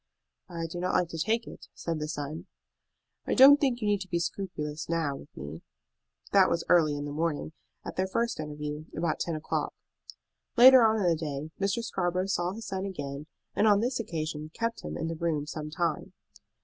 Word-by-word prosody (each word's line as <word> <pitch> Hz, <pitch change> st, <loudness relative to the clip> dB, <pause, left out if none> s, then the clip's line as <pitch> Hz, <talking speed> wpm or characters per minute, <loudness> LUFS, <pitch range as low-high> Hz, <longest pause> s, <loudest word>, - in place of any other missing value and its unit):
"I 170 Hz, -2 st, -4 dB
do 165 Hz, +2 st, -5 dB
not 180 Hz, +1 st, 0 dB
like 180 Hz, -2 st, +2 dB
to 165 Hz, -, -6 dB
take 225 Hz, +7 st, +1 dB
it," -, -, -11 dB
said 165 Hz, -2 st, -3 dB
the 150 Hz, -, -3 dB
son. 155 Hz, +4 st, -5 dB, 0.8 s
"I -, -, +1 dB
don't 280 Hz, +2 st, +9 dB
think 260 Hz, -4 st, +2 dB
you 210 Hz, -, 0 dB
need 205 Hz, -1 st, +2 dB
be 170 Hz, -, 0 dB
scrupulous 165 Hz, -3 st, -4 dB
now 165 Hz, -4 st, 0 dB
with 140 Hz, -, -13 dB
me." 75 Hz, +4 st, -7 dB, 0.7 s
That 195 Hz, -2 st, +6 dB
was 170 Hz, 0 st, 0 dB
early 155 Hz, -4 st, +5 dB
in 145 Hz, 0 st, -4 dB
the 145 Hz, -, -5 dB
morning, 155 Hz, 0 st, -2 dB, 0.3 s
at -, -, -7 dB
their 185 Hz, 0 st, +1 dB
first 230 Hz, +2 st, -1 dB
interview, 150 Hz, 0 st, -5 dB
about 165 Hz, -1 st, 0 dB
ten 170 Hz, -, -1 dB
o'clock. 155 Hz, -, -2 dB, 0.8 s
Later 260 Hz, +1 st, +10 dB
on 220 Hz, -1 st, +5 dB
in 210 Hz, -, 0 dB
the 170 Hz, -, +4 dB
day 155 Hz, -1 st, -5 dB
Mr. 200 Hz, +4 st, 0 dB
Scarborough 185 Hz, -4 st, -1 dB
saw 180 Hz, -2 st, -1 dB
his 225 Hz, +1 st, -8 dB
son 190 Hz, -1 st, -3 dB
again, 145 Hz, -6 st, -5 dB, 0.3 s
and 215 Hz, -, +3 dB
on 205 Hz, -1 st, +5 dB
this 245 Hz, +3 st, 0 dB
occasion 155 Hz, -6 st, -4 dB
kept 230 Hz, 0 st, -2 dB
him -, -, -5 dB
in 160 Hz, -, -2 dB
the 165 Hz, -, -2 dB
room 160 Hz, -3 st, -1 dB
some 150 Hz, 0 st, -5 dB
time. 165 Hz, 0 st, -2 dB
170 Hz, 200 wpm, -29 LUFS, 150-200 Hz, 0.8 s, Later